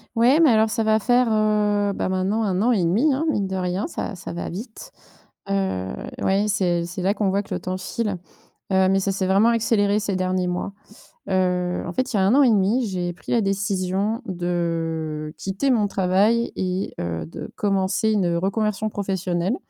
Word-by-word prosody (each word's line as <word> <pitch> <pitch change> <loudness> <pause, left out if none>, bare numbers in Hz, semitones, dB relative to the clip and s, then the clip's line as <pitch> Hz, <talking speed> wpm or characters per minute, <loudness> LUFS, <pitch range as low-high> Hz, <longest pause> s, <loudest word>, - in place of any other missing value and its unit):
Ouais 250 +7 +4
mais 320 -4 +6
alors 220 0 +3
ça 225 - 0
va 215 0 +4
faire, 245 +2 +3
heu, 210 -1 +2
bah, - - -2
maintenant 190 +4 0
1 190 -2 0
an 245 +3 +3
et 205 -6 +2
1/2 210 - +2
hein, 295 +5 -1
mine 200 -9 0
de 190 - -4
rien 180 +2 -1
ça 220 - -5
ça 175 - -8
va 170 - -5
vite. 220 +6 -8 0.6
Heu, 190 - -1 0.3
oui 195 +2 +2
c'est 175 -4 +1
c'est 175 +1 -6
là 195 +2 +2
qu'on 205 -2 0
voit 200 +2 0
que - - -7
le - - -3
temps 185 0 -3
file, 205 +1 -3 0.5
heu, 190 0 +4
mais 195 0 +3
ça 195 - 0
s'est 190 0 -1
vraiment 200 +5 +4
accéléré 215 -3 +2
ces 200 -2 -2
derniers 185 0 0
mois. 180 +2 -3 0.6
Heu, 180 -1 0
en 175 - -4
fait, 255 +5 -1
il - - 0
y 195 - +2
a - - +3
1 220 - +4
an 285 - +6
et 255 - +5
1/2, 220 +4 +2
j'ai 175 -2 -2
pris 165 -4 -11
la 235 - +3
décision 195 +2 -1
de 165 -4 -2
quitter 195 +8 -1
mon 220 -4 +3
travail 200 +5 +2
et 185 +1 -2
heu, 85 -2 -3
de - - -8
commencer 195 +2 +1
une 180 -5 +1
reconversion 210 +3 -1
professionnelle. 190 +1 -1
195 Hz, 200 wpm, -23 LUFS, 180-215 Hz, 0.6 s, mais